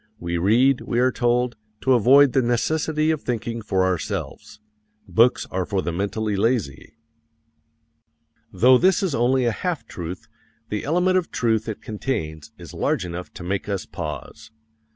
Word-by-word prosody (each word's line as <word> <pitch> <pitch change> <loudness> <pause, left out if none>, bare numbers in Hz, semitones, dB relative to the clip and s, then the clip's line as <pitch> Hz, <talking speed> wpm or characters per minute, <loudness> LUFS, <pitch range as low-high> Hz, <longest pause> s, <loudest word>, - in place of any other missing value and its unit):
We 85 0 -3
read, 120 +8 +3
we 120 - -3
are 130 +1 +3
told, 120 -1 0 0.2
to 130 - +3
avoid 130 +3 +6
the 135 - +3
necessity 155 +6 0
of 155 -2 -2
thinking 115 -1 -3
for 95 -3 0
ourselves. 95 +3 -4 0.5
Books 115 +2 +3
are 95 0 -1
for 95 +1 -2
the 85 - -2
mentally 100 +4 -2
lazy. 110 - -1 1.5
Though 125 +1 +5
this 190 +2 +3
is 185 -6 0
only 125 +2 +2
a 120 - +2
half 170 +7 -3
truth, 85 +1 -7 0.4
the 105 - -3
element 180 +5 +2
of 175 - -7
truth 115 -2 0
it 110 - -6
contains 80 - -4
is - - -11
large - - -1
enough 90 +1 -7
to - - -8
make 95 +3 -3
us 100 -2 -2
pause. 90 +7 -7
115 Hz, 155 wpm, -23 LUFS, 95-130 Hz, 1.5 s, avoid